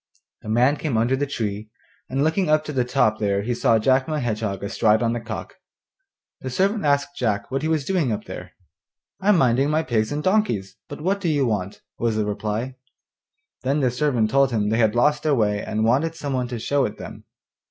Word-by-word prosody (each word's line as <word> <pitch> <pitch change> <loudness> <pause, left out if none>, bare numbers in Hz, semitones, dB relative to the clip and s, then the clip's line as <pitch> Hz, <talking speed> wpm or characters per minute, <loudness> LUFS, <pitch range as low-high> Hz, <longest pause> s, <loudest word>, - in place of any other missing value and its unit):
The - - -8
man 125 +6 +3
came 140 -7 -1
under 120 +4 +2
the 145 +2 -1
tree, 105 -4 -4 0.4
and 135 +2 0
looking 160 +3 +1
up 155 0 +3
to 150 - -5
the 130 -2 +1
top 120 -4 +1
there 100 -1 0
he 120 +3 -1
saw 115 -1 +3
Jack 130 +4 +2
my 155 -1 -1
Hedgehog 110 -6 -2
astride 110 +2 +2
on 115 0 +1
the 120 - -2
cock. 115 -2 -7 0.9
The 130 - -5
servant 195 - 0
asked 140 0 +1
Jack 105 -3 -1
what 135 - -1
he 155 - -1
was 155 -4 0
doing 165 -7 0
up 105 - -3
there. - - -9 0.7
'I'm 195 0 +3
minding 130 0 +3
my 155 +1 +1
pigs 110 -5 0
and 150 +1 -2
donkeys; 150 - 0
but 145 - -8
what 195 +4 0
do 175 - 0
you 145 -3 +2
want?' 100 -4 -3 0.2
was 115 -2 0
the 110 -1 0
reply. 105 +5 -3 0.8
Then 140 +4 0
the 125 -2 +2
servant 125 -4 +1
told 135 -1 +4
him 105 -4 0
they 110 +2 +1
had 110 -1 +3
lost 150 +5 +3
their 150 -2 +2
way, 105 -3 +1
and 110 +1 -1
wanted 145 +8 +1
some 145 -4 -4
one 125 -1 -1
to 120 -1 -5
show 140 +5 0
it 105 - -5
them. - - -10
125 Hz, 215 wpm, -23 LUFS, 110-145 Hz, 0.9 s, told